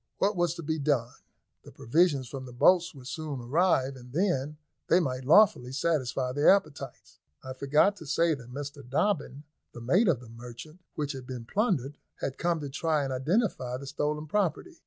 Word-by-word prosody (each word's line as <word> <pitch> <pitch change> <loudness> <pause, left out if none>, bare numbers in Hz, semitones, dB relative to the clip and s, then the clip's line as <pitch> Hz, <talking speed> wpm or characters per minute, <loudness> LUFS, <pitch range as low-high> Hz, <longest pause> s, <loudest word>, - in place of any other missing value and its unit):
What 200 +2 +1
was 175 -2 +1
to 170 - -7
be 160 +1 -2
done? 135 -5 0 0.5
The - - -14
provisions 145 -1 +1
from 130 +1 -7
the - - -10
boats 175 +6 +4
would 130 -2 -12
soon 150 0 -5
arrive, 135 +1 +1
and 125 -1 -13
then 150 -5 0 0.3
they 175 - +5
might 130 -6 -2
lawfully 155 -6 +5
satisfy 135 -4 0
their 145 +3 +4
appetites. 150 -9 0 0.2
I 130 - -6
forgot 150 +10 +2
to 160 - -11
say 165 +3 +2
that 125 -4 -9
Mr 140 +2 -6
Dobbin, 145 0 -1 0.3
the 120 - -9
mate 180 - +3
of 160 -9 +3
the 120 - -13
merchantman 120 +9 -11
which 145 -1 -2
had 130 -2 -8
been 125 -3 -6
plundered, 150 - -1 0.2
had 135 - -5
come 170 -1 +1
to 145 - -5
try 155 +1 0
and 135 -1 -3
identify 130 - 0
the 140 - -9
stolen 150 +2 -2
property. 210 - -2
145 Hz, 185 wpm, -28 LUFS, 130-170 Hz, 0.5 s, they